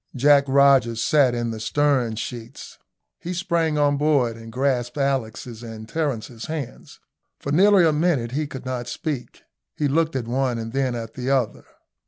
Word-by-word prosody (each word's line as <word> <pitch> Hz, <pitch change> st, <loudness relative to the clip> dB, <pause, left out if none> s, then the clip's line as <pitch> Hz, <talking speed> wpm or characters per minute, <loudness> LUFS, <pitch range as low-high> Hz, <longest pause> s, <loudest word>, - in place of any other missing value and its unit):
Jack 140 Hz, +2 st, +5 dB
Rogers 135 Hz, -4 st, +4 dB
sat 135 Hz, -5 st, +3 dB
in 120 Hz, -1 st, -2 dB
the 110 Hz, -, -6 dB
stern 130 Hz, -2 st, +1 dB
sheets. 115 Hz, +1 st, -8 dB, 0.4 s
He 180 Hz, +2 st, -5 dB
sprang 170 Hz, -4 st, 0 dB
on 145 Hz, -1 st, +2 dB
board 140 Hz, -6 st, +2 dB
and 115 Hz, 0 st, -11 dB
grasped 125 Hz, 0 st, -1 dB
Alick's 135 Hz, -6 st, -1 dB, 0.2 s
and 110 Hz, -2 st, -9 dB
Terence's 125 Hz, -6 st, -3 dB
hands. 155 Hz, -6 st, -7 dB, 0.4 s
For 140 Hz, -, -4 dB
nearly 190 Hz, +3 st, +5 dB
a 160 Hz, -, +3 dB
minute 150 Hz, -7 st, +1 dB
he 150 Hz, +3 st, -2 dB
could 130 Hz, -2 st, -9 dB
not 125 Hz, -2 st, -4 dB
speak. 150 Hz, -8 st, -5 dB, 0.3 s
He 150 Hz, -, 0 dB
looked 160 Hz, +2 st, +1 dB
at 120 Hz, -3 st, -2 dB
one 125 Hz, 0 st, 0 dB
and 115 Hz, 0 st, -6 dB
then 135 Hz, -2 st, 0 dB
at 115 Hz, -1 st, -6 dB
the 125 Hz, +1 st, -4 dB
other. 130 Hz, -5 st, 0 dB
135 Hz, 170 wpm, -23 LUFS, 120-150 Hz, 0.4 s, Jack